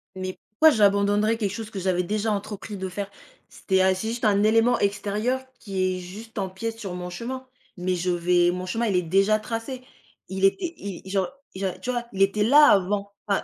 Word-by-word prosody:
Mais 185 0 -5
pourquoi 315 +10 +6
j'abandonnerais 205 -2 +3
quelque 205 -4 -1
chose 220 +1 -6
que 200 - -5
j'avais 180 -1 +1
déjà 215 +4 -1
entrepris 205 0 -4
de 190 0 -4
faire? 200 +2 -5 0.4
C'était 190 -1 0
ah, 190 0 +4
c'est 220 +4 -3
juste 235 0 -3
un 205 -1 +3
élément 225 +3 +4
extérieur 210 +5 0 0.2
qui 185 -3 -1
est - - -5
juste 210 +6 -10
empiète 205 +4 -4
sur 195 -5 -5
mon 180 0 -5
chemin. 255 +8 -6 0.3
Mais 180 +1 -1
je 180 +1 -1
vais 175 0 +3
mon 180 +1 -4
chemin 225 +5 -1
il 205 -4 +1
est 180 - +3
déjà 195 +5 +3
tracé, 230 +4 -5 0.5
il 190 +1 +1
était 340 - +1
i 195 -4 -7
il 190 - -10
genre 190 -2 +1 0.3
genre, 190 -1 -2
tu 250 - -5
vois? 240 -1 -2
Il 195 - -3
était 195 +2 +3
là 290 +7 +7
avant. 200 0 +2 0.2
Enfin 200 -1 +1
200 Hz, 210 wpm, -25 LUFS, 185-225 Hz, 0.5 s, là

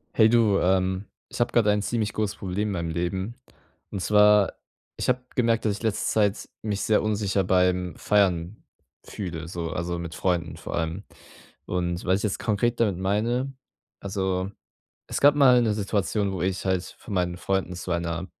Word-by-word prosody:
Hey 110 -1 +6
du, 110 -4 +4
ähm, 95 +1 +1 0.2
ich - - -8
habe 120 - +2
grade 105 -3 +4
ein 105 - +1
ziemlich 110 -1 -1
großes 105 -2 -1
Problem 100 +2 -2
in - - -2
meinem 85 -2 -2
Leben. 95 +6 -2 0.5
Und 100 - -4
zwar, 105 +1 +5 0.4
ich - - -2
habe 125 0 +2
gemerkt, 115 -2 +2
dass 110 - +3
ich - - -13
letzte 110 -2 -1
Zeit 105 -2 +1
mich 105 -2 -2
sehr 110 - +3
unsicher 100 -2 0
beim 90 -1 +1
Feiern 95 -2 +1 0.4
fühle, 85 -5 -6
so, 85 -1 -4
also, 85 0 -3
mit 85 -1 -6
Freunden 85 -1 -1
vor - - -6
allem. 85 +4 -2 0.6
Und 90 -1 -2
was 95 0 +3
ich - - -6
jetzt 100 - -1
konkret 115 +2 0
damit 105 -5 +2
meine: 115 +8 0 0.5
Also, 95 -1 -2 0.6
es - - -3
gab 145 +1 +7
mal 130 -4 +6
'ne 110 -3 +1
Situation, 100 0 0
wo 90 - -3
ich 95 +1 -1
halt 95 -2 +1
von 105 - -8
meinen 90 -1 0
Freunden 95 -1 -1
zu 90 +1 -5
einer 85 0 -2
95 Hz, 180 wpm, -25 LUFS, 90-105 Hz, 0.6 s, gab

